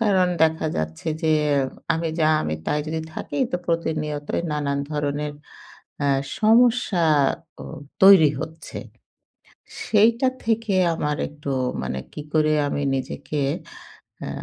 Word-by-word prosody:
কারণ 195 -5 +3 0.2
দেখা 160 0 +2
যাচ্ছে 80 - -4
যে, 160 - +2 0.6
আমি 165 +1 -2
যা 155 - +4
আমি 75 - -2
তাই 150 - +1
যদি 160 +1 -2
থাকি, - - -5
তো 180 - 0
প্রতিনিয়তই 155 -3 -2
নানান 140 -1 -1
ধরনের 150 0 -2 0.7
আ - - +2 0.3
সমস্যাও 200 - +2 0.4
তৈরি 190 -6 +8
হচ্ছে। 160 0 -8 1.1
সেইটা 230 +4 +3 0.2
থেকে 225 -2 0 0.2
আমার 150 -2 -2
একটু 150 -1 -8 0.3
মানে 65 - -3
কি - - -6
করে 155 -1 +3 0.2
আমি 145 - -2
নিজেকে 140 +3 -4 0.9
আ - - -4
155 Hz, 115 wpm, -23 LUFS, 150-190 Hz, 1.1 s, তৈরি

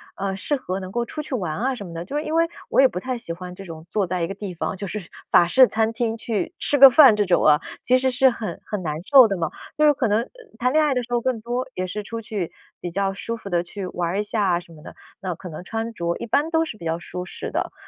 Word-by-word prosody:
呃， 195 0 -2
适 195 +10 -1
合 190 -8 -4
能 185 -1 -7
够 240 0 0
出 305 +5 -5
去 285 -3 -4
玩 180 -9 -2
啊 260 +2 0
什 205 - -8
么 170 - -9
的。 165 +1 -5
就 275 - -7
是 300 - 0
因 310 - -4
为 330 0 +4 0.2
我 - - +2
也 270 - +8
不 180 - -7
太 255 -1 -3
喜 170 -7 -5
欢 180 +1 -8
这 195 +1 -10
种 160 -2 -9
坐 205 -3 0
在 180 0 -2
一 - - 0
个 195 - -5
地 195 -2 -6
方。 180 +3 -3
就 200 +2 -5
是， 195 -2 -6 0.2
法 175 - +6
式 255 +8 +6
餐 220 0 0
厅 230 -1 -1
去 225 - -3
吃 290 - +1
个 275 0 +11
饭 260 -2 +8
这 205 - +2
种 180 -2 +2
啊。 150 0 +6 0.2
其 255 - +4
实 260 0 +1
是 260 +1 +4
很 215 -7 -5
很 210 -3 -4
难 155 -3 -3 0.2
受 265 -4 +9
的 200 - -1
嘛。 165 -2 -1 0.3
就 305 - +4
是 295 - +6
可 265 -4 0
能 220 +3 0 0.3
谈 250 +2 +1
恋 310 +2 +4
爱 290 - +2
的 250 -1 -1
时 245 - -13
候 240 - +3
更 240 -2 -1
多， 245 +3 -3
也 185 - -2
是 210 +3 -4
出 230 +2 -6
去 205 -6 -4 0.3
比 175 - -5
较 195 +2 0
舒 230 +4 -4
服 220 -3 -9
地 175 -2 +1
去， 185 +3 -7
玩 175 -1 -2
儿 190 - -2
一 210 - +1
下 205 -4 +1
什 170 - -16
么 155 -2 -14
的。 - - -11 0.2
那 185 -4 -4
可 180 +2 -9
能 155 - -7
穿 225 +1 -3
着 170 -4 -2
一 - - -5
般 285 +7 +1
都 325 0 +2
是 310 -9 -7
比 170 - -10
较 165 0 0
舒 180 +1 -7
适 - - -7
的。 - - -2
210 Hz, 320 characters per minute, -23 LUFS, 180-250 Hz, 0.3 s, 个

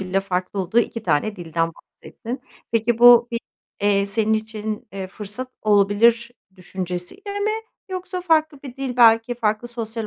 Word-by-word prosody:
bile 190 0 0
farklı 190 0 -3
olduğu 190 +5 0
2 230 -1 -1
tane 210 +3 0
dilden 165 -1 -2
bahsettin. 245 +4 -9 0.3
Peki 230 0 +1
bu 240 0 +8
bir, 235 -1 -2 0.4
eee, 200 -1 +2
senin 215 +2 +1
için, 215 -1 -4
eee, 195 -1 -5
fırsat 210 +6 -7
olabilir 215 +3 +3 0.3
düşüncesiyle 185 - -5
mi 420 +1 +1 0.4
yoksa 370 0 -5
farklı 315 -4 +1
bir 265 -2 -9
dil 265 -2 -4
belki 230 0 +5
farklı 220 0 -1
sosyal 230 -1 -5
220 Hz, 150 wpm, -22 LUFS, 200-245 Hz, 0.4 s, bu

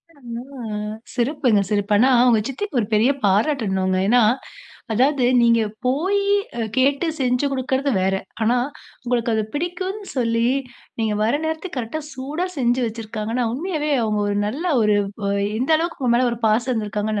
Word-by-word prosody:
ஆ. - - -23 1.0
சிறப்புங்க! 245 -4 +2
சிறப்பு! 205 0 0
ஆனா, 250 +5 +5 0.2
உங்க 230 -3 +5
சித்திக்கு 280 +4 -4
ஒரு 210 - -1
பெரிய 225 +6 +4
பாராட்டணும்ங்க. 195 -3 +1
ஏன்னா? 245 +3 +5 0.7
அதாவது 260 +3 +2 0.2
நீங்க 230 -1 +4 0.3
போயி 375 +10 +1 0.3
அ - - -1 0.2
கேட்டு, 275 +5 +2
செஞ்சு 250 +1 +1
குடுக்குறது 265 +1 0
வேற. 190 +1 +1 0.3
ஆனா, 235 +3 +3 0.5
உங்களுக்கு 240 -1 0
அது 220 - +1
பிடிக்கும்னு 370 +6 -3
சொல்லி, 230 -2 +1 0.5
நீங்க 220 -1 0
வர 220 +2 +2
நேரத்துக்கு, 320 +1 -4
கரெக்ட்டா 245 +6 -3
சூடா 285 +7 -3
செஞ்சு 245 0 +1
வச்சிருக்காங்கன்னா, 225 +1 -3
உண்மையாவே 305 +1 -2
அவங்க 215 -2 0
ஒரு 205 - -1
நல்ல 270 +11 -4 0.2
ஒரு 210 -1 +3 0.3
அ - - +1 0.3
எந்த 260 +6 +1
அளவுக்கு 335 0 -3
உங்க 245 -2 +3
மேல 250 0 +3
ஒரு 235 - -6
பாசம் 235 +4 +2
இருந்துருக்காங்கன்னு, 210 -1 -2
245 Hz, 150 wpm, -21 LUFS, 220-285 Hz, 1.0 s, ஆனா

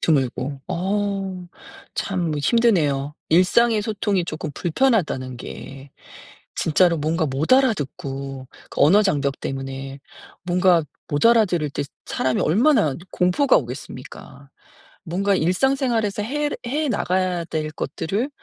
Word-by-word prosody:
드물고. 135 -2 0
어 195 -1 -2 0.5
참 180 -5 -1
힘드네요. 150 - +2
일상의 210 +6 +4
소통이 205 -4 -1
쪼금 155 -2 -5
불편하다는 170 - 0
게, 135 +3 -9 0.7
진짜로 170 +2 +3
뭔가 160 +1 0
못 140 - 0
알아듣고 135 - 0 0.2
그 - - -5
언어 195 +9 +6
장벽 140 -8 0
때문에. 135 0 -5 0.4
뭔가 180 -2 +3 0.2
못 145 +10 +2
알아들을 185 -10 +3
때 145 - -3 0.2
사람이 130 -1 0
얼마나 210 - +3 0.2
공포가 180 +11 +3
오겠습니까? - - -9 0.5
뭔가 195 +3 0
일상생활에서 225 - +1
해 295 +5 -1 0.2
해 295 +4 -1
나가야 185 -5 0
될 155 -1 -3
것들을 195 - -3
175 Hz, 260 characters per minute, -22 LUFS, 145-210 Hz, 0.7 s, 언어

